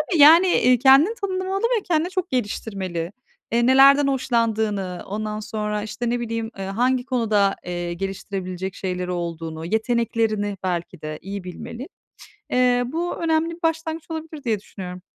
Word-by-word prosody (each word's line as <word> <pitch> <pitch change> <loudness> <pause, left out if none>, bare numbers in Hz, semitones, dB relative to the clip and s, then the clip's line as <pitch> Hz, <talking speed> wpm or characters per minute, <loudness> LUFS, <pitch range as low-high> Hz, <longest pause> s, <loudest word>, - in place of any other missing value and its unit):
tabii, 310 +1 0
yani, 335 +5 +8
iii, 250 -7 +4
kendini 275 - +6
tanımlamalı 380 -1 -2
ve 465 -3 +1
kendine 340 +1 +1
çok 370 -1 -2
geliştirmeli. 195 -7 -3 0.4
Eee, 235 0 +3
nelerden 275 +2 +7
hoşlandığını, 220 -8 0
ondan 215 +1 -4
sonra, 210 -1 -3
işte, 235 +2 -3
ne 240 0 0
bileyim, 230 -1 -3
ııı, 195 - -4
hangi 245 +4 +1
konuda, 215 -6 +1
eee, 175 -1 -3
geliştirebilecek 190 0 -4
şeyleri 180 -1 -3
olduğunu, 165 -2 -4
yeteneklerini 220 -1 0
belki 175 -4 -3
de 155 0 -5
iyi 195 -1 -6
bilmeli. 235 - -7 0.6
Eee, 250 -1 +3
bu 335 +6 -2
önemli 330 0 +1
bir 345 - -24
başlangıç 325 0 -1
olabilir 320 -2 -6
diye 220 -3 +1
düşünüyorum. 180 -3 -8
230 Hz, 145 wpm, -23 LUFS, 195-290 Hz, 0.6 s, yani